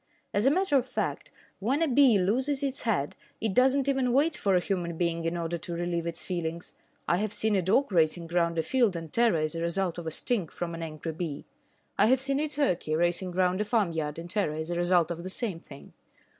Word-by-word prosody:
As 205 +5 +2
a - - +8
matter 345 -1 +2
of 260 -1 0
fact, - - -3 0.3
when 265 +10 +1
a - - +2
bee 260 -4 +5
loses 260 +9 0
its 275 -1 -1
head, 190 - -1 0.2
it 220 -3 -1
does 260 +5 +4
not 275 -1 0
even 265 -3 +1
wait 300 +4 +3
for 195 -2 +1
a - - +5
human 175 -3 -3
being 170 -1 -1
in 165 +1 -1
order 170 0 -3
to 170 +1 -5
relieve 170 -1 -2
its 170 0 -4
feelings, 170 -2 -4 0.3
I 175 - +3
have 210 +1 -1
seen 220 -1 0
a 190 - +2
dog 210 +9 +2
racing 170 -1 +2
round 170 -1 +1
a 160 - +1
field 240 -5 +2
in 165 -1 -6
terror 230 -1 +3
as 155 0 0
a 165 - -4
result 170 0 0
of 165 - -7
a - - -2
sting 210 -1 0
from 170 +2 -5
an 165 - -6
angry 160 0 -5
bee. 155 -3 -5 0.5
I - - +6
have 260 +2 +4
seen 275 +1 0
a 305 0 -1
turkey 225 - 0
racing 175 +2 0
round 185 +2 +1
a - - +2
farmyard 170 -9 -1
in 170 +1 -7
terror 185 -5 -1
as 160 +2 -4
a - - -1
result 175 -1 +2
of 170 0 -4
the 185 - -6
same 190 -4 -2
thing. 140 -4 -14
180 Hz, 240 wpm, -28 LUFS, 170-240 Hz, 0.5 s, a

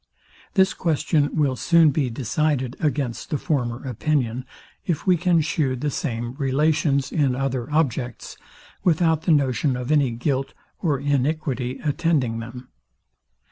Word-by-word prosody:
This 190 -1 +4
question 155 -2 +1
will 145 -4 +2
soon 165 +2 +4
be 135 -2 0
decided 130 +2 -1
against 140 -6 -2
the 150 - 0
former 125 -4 -2
opinion, 130 -1 -1 0.4
if 170 -5 -2
we 185 - +5
can 175 -1 +2
shew 150 -4 0
the 145 +4 -2
same 120 -4 -3
relations 140 0 +1
in 140 -5 +1
other 130 0 -2
objects, 125 -6 -1 0.5
without 160 -2 +3
the - - +6
notion 135 -2 +2
of 125 +3 -3
any 145 -4 +3
guilt 130 +3 -2 0.2
or 150 -6 0
iniquity 140 -2 -1
attending 145 -7 0
them. 125 +2 -9
140 Hz, 135 wpm, -23 LUFS, 125-155 Hz, 0.5 s, the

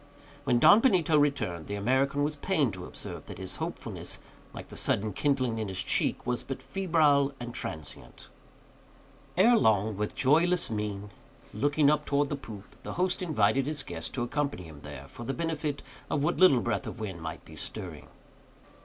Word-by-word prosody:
When 120 - +3
Don 205 - +8
Benito 185 - +3
returned, 110 - +1
the 100 - -3
American 130 +7 +1
was 150 +1 0
pained 145 - +1
to 90 -1 -7
observe - - -5
that - - -8
his - - -4
hopefulness, - - -5 0.3
like - - -9
the - - -10
sudden 105 0 0
kindling 130 -3 0
in 110 - -2
his 95 0 -2
cheek, - - +1
was 125 0 0
but 135 - -6
febrile 155 -7 +2
and 120 0 -6
transient. 80 -9 -6 1.1
Ere 230 +6 +6
long, 110 - +3
with 105 +1 -2
a - - -25
joyless 165 +3 +3
mien, 105 -1 -3 0.4
looking 145 +5 +3
up 150 0 0
towards 145 0 +1
the - - 0
poop, 105 -7 -11
the - - -6
host 180 +1 0
invited 135 - +2
his 150 0 -2
guest 80 -1 -5
to 125 - -1
accompany 140 -4 -2
him 80 -3 -11
there, 75 -2 -9
for 120 - -10
the 135 +4 -3
benefit 155 -3 -2 0.3
of 145 - 0
what 170 - +1
little 160 -10 +6
breath 110 -5 -1
of - - -7
wind 95 -6 -5
might 80 -1 -6
be - - -12
stirring. - - -6
135 Hz, 180 wpm, -29 LUFS, 105-150 Hz, 1.1 s, Don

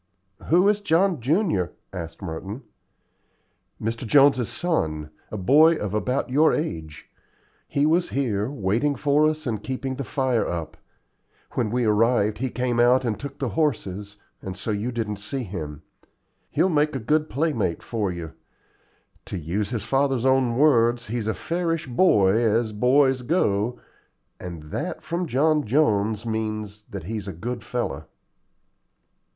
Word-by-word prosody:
"Who 180 +4 +4
is 210 0 +3
John 180 -4 +2
junior?" 140 - +1 0.2
asked 85 0 -7
Merton. 95 +8 -6 1.2
"Mr. 115 +3 -3
Jones's 135 -2 +5
son, 80 - -1 0.2
a 105 - -5
boy 150 - +5
of 105 -8 -4
about 125 +6 0
your 155 +4 +4
age. 80 - -5 0.6
He 140 +1 +1
was 170 +3 +2
here 115 -5 -1
waiting 130 +3 0
for 145 +2 +3
us, 155 0 -4
and 110 -5 -2
keeping 130 +1 -3
the 140 - -3
fire 130 -2 0
up. 85 -2 -4 0.8
When 115 -3 -1
we 125 +2 0
arrived 110 0 +2
he 130 +1 -1
came 125 -1 -1
out 125 +2 +4
and 110 -3 -1
took 140 - -7
the 135 -3 -2
horses, 105 - -2 0.2
and 95 -1 -6
so 100 +3 -3
you 105 +4 -2
didn't 110 -4 -3
see 130 +6 -4
him. 80 -7 -6 0.7
He'll - - +2
make 150 -3 +1
a - - -1
good 150 +7 +1
playmate 125 - -1
for 105 -5 -2
you. 85 -3 -7 0.9
To - - -5
use 90 +6 -2
his 115 -5 -3
father's 135 -1 +1
own 130 -3 +3
words, 120 -5 +4
'He's 115 -1 -3
a 110 - 0
fairish 165 -1 -2
boy 120 - +4
as 110 0 +2
boys 130 +4 +3
go,' 120 - 0 0.6
and 85 -3 -7
that - - -4
from 170 +1 -2
John 150 +3 +2
Jones 110 -4 +1
means 110 -2 -4
that 100 -4 -6
he's 105 +2 -5
a 95 - -4
good 120 +8 -5
fellow." 110 - -4
120 Hz, 150 wpm, -24 LUFS, 105-140 Hz, 1.2 s, Jones's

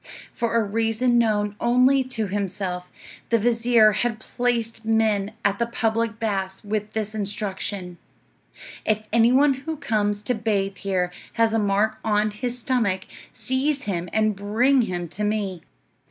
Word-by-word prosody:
For 230 -1 -1
a 230 - +4
reason 225 +3 +1
known 210 -3 +1
only 255 +3 +4
to 240 -4 -2
himself, 190 -2 -3 0.4
the 230 - +4
vizir 230 -1 +4
had 220 +2 -1
placed 230 -1 -2
men 220 -2 +1
at 200 0 +2
the 235 - +1
public 230 -1 -1
baths 195 -3 -2
with 210 0 -3
this 215 -1 -3
instruction: 200 -3 -3 0.8
"If 215 0 0
any 230 +1 +5
one 275 +2 +5
who 285 +4 -5
comes 210 -6 0
to 250 - 0
bathe 205 -4 -1
here 185 -2 -1 0.2
has 225 -1 +2
a 225 - +2
mark 205 +1 +1
on 210 0 +1
his 245 +3 -4
stomach, 225 -7 0 0.3
seize 275 +2 -1
him 175 -3 -3
and 215 -1 +1
bring 230 +7 +2
him 175 -6 -3
to 210 - -5
me." 205 -4 -1
215 Hz, 150 wpm, -24 LUFS, 200-235 Hz, 0.8 s, any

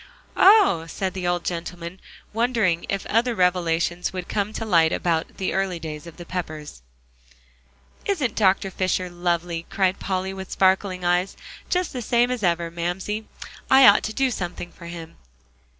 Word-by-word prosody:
"Oh!" 380 - +6
said 190 +2 -3
the 185 -2 -3
old 175 -1 0
gentleman, 175 +1 -5 0.3
wondering 225 -7 +1
if 195 -1 -2
other 235 +2 +1
revelations 175 -1 +1
would 185 -1 -5
come 205 0 -1
to 225 - -4
light 165 -6 +4
about 165 -2 -1
the 190 - -2
early 190 -2 0
days 155 -1 -7
of 170 - -12
the 175 - -9
Peppers. 155 - -6 1.3
"Isn't 295 - 0
Dr. 195 -2 +2
Fisher 185 -1 -1
lovely?" 175 -1 -2
cried 190 -1 +1
Polly, 190 0 -2
with 190 -1 -8
sparkling 190 -1 +1
eyes, 180 +2 +1 0.3
"just 360 -1 0
the 250 - -4
same 240 +2 +2
as 250 -3 -2
ever. 170 -2 0
Mamsie, 180 +6 -3 0.4
I 265 0 +8
ought 205 0 +7
to 220 - -3
do 265 +2 +1
something 175 -4 -5
for 170 - -12
him. 165 -1 -9
185 Hz, 160 wpm, -23 LUFS, 170-205 Hz, 1.3 s, I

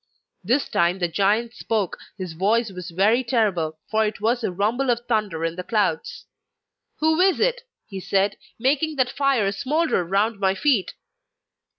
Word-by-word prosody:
This 250 +9 +1
time 170 +2 +1
the 175 -2 0
giant 210 +6 +1
spoke; 215 -6 -2 0.2
his 185 -4 -6
voice 210 +6 +1
was 180 -1 -7
very 205 +8 +2
terrible, 195 -10 0
for 220 0 +3
it 215 -1 -2
was 235 +4 +1
the 220 - -1
rumble 220 +8 0
of 240 -1 +1
thunder 210 -8 -1
in 165 0 -2
the 180 - -4
clouds. 185 -7 -1 0.8
'Who 315 +1 +3
is 380 -1 +3
it,' - - +1 0.2
he 195 -3 -7
said, 195 +1 +1 0.2
'making 295 +6 +1
that 255 -2 +1
fire 270 -9 +1
smoulder 295 - 0
around 200 +5 0
my 190 -1 +2
feet? 250 -6 +1
215 Hz, 165 wpm, -23 LUFS, 190-250 Hz, 0.8 s, for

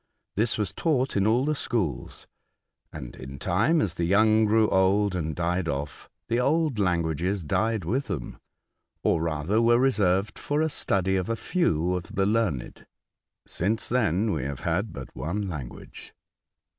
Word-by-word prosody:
This 110 +3 +1
was 100 -3 -1
taught 135 0 0
in 100 0 +2
all 120 +5 +3
the 155 - +1
schools, 110 - -3 0.7
and 65 -6 -8
in 65 +1 -9
time, 115 - +2
as 100 - 0
the 85 - -3
young 110 +5 +4
grew 110 +1 +4
old 95 +1 +3
and 80 -4 -2
died 85 0 -1
off, 70 +1 -5 0.2
the 120 - +1
old 145 -1 +1
languages 90 0 0
died 110 +4 0
with 130 - -1
them, 85 -11 -5 0.6
or 80 - +2
rather 80 +7 0
were 120 0 +5
reserved 100 -6 +1
for 145 +1 -1
a 160 0 +2
study 95 - 0
of 95 +2 -2
a 115 - +1
few 90 - 0
of 90 0 -5
the 95 - +2
learned. 105 - -1 0.6
Since 105 +6 -1
then 110 -4 +1
we - - -2
have 70 0 -5
had 95 +6 -1
but 65 -2 -9
one 100 +6 -3
language." 70 -9 -8
100 Hz, 160 wpm, -26 LUFS, 85-115 Hz, 0.7 s, were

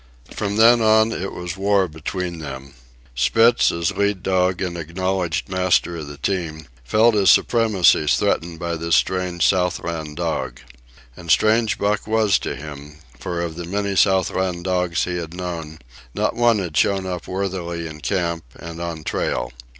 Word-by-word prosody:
From 100 -1 -3
then 115 +2 +6
on 110 0 +4
it 95 -2 -4
was 90 -1 -6
war 100 -1 +2
between 85 +2 -5
them. 70 -3 -8 0.4
Spitz, 115 - +4
as 85 0 -1
lead 100 -2 -1
dog 90 -1 +1
and 90 -2 -3
acknowledged 90 +1 -2
master 90 -2 +1
of 75 -3 -7
the 70 0 -9
team, 80 -2 -3 0.2
felt 110 - +3
his 100 -2 +3
supremacy 105 -9 +4
threatened 80 +5 +1
by 85 0 -3
this 85 +1 +1
strange 90 -2 +1
Southland 85 -4 -1
dog. 65 -8 -3 0.6
And 85 - -11
strange 110 +4 +3
Buck 105 0 -1
was 110 -4 +2
to - - -4
him, 75 0 -10 0.2
for 85 0 -3
of 85 -2 -3
the 85 0 -6
many 100 +2 -2
Southland 95 -2 +1
dogs 90 -2 0
he 90 -1 -2
had 85 -1 -6
known, 85 -4 -6 0.4
not - - 0
one 120 -1 +3
had 90 -6 -4
shown 95 +4 +2
up 90 -2 -5
worthily 90 -3 -3
in 75 -1 -8
camp 85 -3 -1
and 85 0 -8
on 85 -2 -5
trail. - - -2
90 Hz, 160 wpm, -21 LUFS, 80-95 Hz, 0.6 s, then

